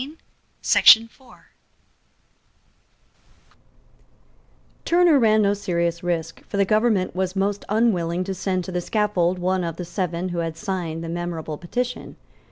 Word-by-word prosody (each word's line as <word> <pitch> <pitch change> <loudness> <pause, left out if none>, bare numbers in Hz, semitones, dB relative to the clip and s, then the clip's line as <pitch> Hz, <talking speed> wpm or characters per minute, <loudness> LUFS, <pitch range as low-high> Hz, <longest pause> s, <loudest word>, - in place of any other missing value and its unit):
Turner 340 -4 +4
ran 215 -2 +4
no 200 0 +2
serious 170 -4 -2
risk; 165 -2 -3
for 200 - -4
the 200 - +3
government 215 -3 +1
was 185 0 -2
most 200 +1 -1
unwilling 185 -6 +1
to 195 +1 -4
send 185 0 -2
to 185 - -7
the 180 0 -2
scaffold 185 -3 0
one 185 +1 -1
of 165 -2 -4
the 180 - -6
Seven 175 0 -3
who 175 -1 -3
had 165 -1 -3
signed 175 -5 -4
the - - -5
memorable 165 -3 -5
petition. 245 +8 -4
185 Hz, 125 wpm, -22 LUFS, 170-205 Hz, -, Turner